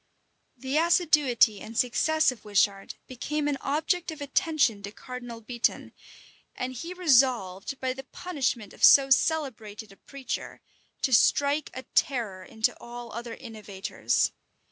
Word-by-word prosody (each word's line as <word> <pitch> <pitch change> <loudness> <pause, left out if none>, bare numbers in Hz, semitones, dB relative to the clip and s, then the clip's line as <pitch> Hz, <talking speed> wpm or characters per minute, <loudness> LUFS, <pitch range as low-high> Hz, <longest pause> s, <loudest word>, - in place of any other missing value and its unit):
[*] - - -46
The 265 +4 -2
assiduity 300 - +3
and 225 +1 -8
success 315 +5 +2
of 240 -4 -12
Wishart 200 -1 0
became 295 +4 -3
an 285 -2 -1
object 325 +5 -1
of 315 -1 -7
attention 285 -6 +1
to 200 0 -7
Cardinal 245 0 -9
Beatoun; 235 +1 -2 0.6
and 255 +1 -4
he 330 +8 -7
resolved, 255 - +2
by 260 -1 -1
the 270 +1 -10
punishment 260 - -3
of - - -12
so 275 -1 +7
celebrated 225 -9 0
a 195 - -17
preacher, 275 -2 -6 0.4
to 260 - +1
strike 285 +5 +3
a 260 - -6
terror 220 -9 0
into 220 +4 -1
all 240 -1 -9
other 235 +1 -6
innovators. 210 -4 -2
255 Hz, 140 wpm, -27 LUFS, 220-285 Hz, 0.6 s, so